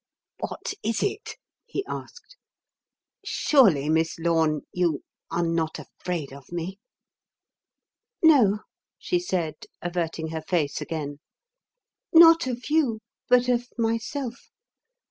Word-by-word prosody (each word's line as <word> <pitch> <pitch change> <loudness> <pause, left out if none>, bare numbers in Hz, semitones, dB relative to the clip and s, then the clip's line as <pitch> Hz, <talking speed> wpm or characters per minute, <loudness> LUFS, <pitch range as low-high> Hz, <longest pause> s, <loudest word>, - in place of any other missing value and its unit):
"What - - -4
is 225 +1 -1
it?" 415 +1 -3 0.3
he 395 - -3
asked. - - -8 0.9
"Surely, 190 - +4
Miss 160 +1 +1
Lorne, 160 -2 +1
you 170 -5 0 0.3
are 170 - 0
not 165 -1 -1
afraid 170 -7 -5
of 140 +1 -13
me?" 175 +3 -4 1.4
"No," 230 -10 +6 0.4
she 355 - 0
said, 170 - -3
averting 170 -2 -3
her 160 0 -4
face 155 -3 -1
again. 145 -3 -4 0.9
"Not 330 -3 +8
of 245 -1 -4
you 265 -9 +2 0.3
but 250 0 +5
of 245 -1 +1
myself. 230 +3 -2
180 Hz, 105 wpm, -25 LUFS, 160-250 Hz, 1.4 s, Not